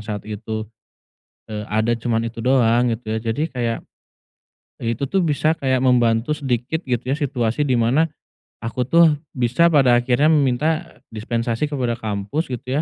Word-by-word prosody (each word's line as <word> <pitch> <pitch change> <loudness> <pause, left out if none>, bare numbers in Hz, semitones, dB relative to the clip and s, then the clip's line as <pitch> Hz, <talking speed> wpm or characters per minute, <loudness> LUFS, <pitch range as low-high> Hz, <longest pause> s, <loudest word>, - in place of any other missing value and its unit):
saat 105 -1 -6
itu, 110 +1 -5 0.8
eee, 105 -1 -5
ada 110 +2 +1
cuman 115 0 -1
itu 115 0 -6
doang 120 -2 +3
gitu 110 -1 -4
ya, - - 0
jadi 145 +8 -1
kayak 120 -5 -2 1.0
itu 120 +4 -3
tuh 190 -2 +1
bisa 155 +1 +1
kayak 130 -2 0
membantu 125 +2 +2
sedikit 135 +4 -2
gitu 125 -2 -1
ya 140 - +1
situasi 135 -1 -1
di 130 - +1
mana, 120 +7 +3 0.5
aku 115 +2 -4
tuh 160 -2 +5 0.2
bisa 125 +8 +3
pada 135 -6 +4
akhirnya 125 +4 +2
meminta 155 +4 0 0.2
dispensasi 115 +5 -2
kepada 125 -5 -1
kampus 110 - -3
gitu 130 +4 -2
125 Hz, 150 wpm, -21 LUFS, 115-145 Hz, 1.0 s, tuh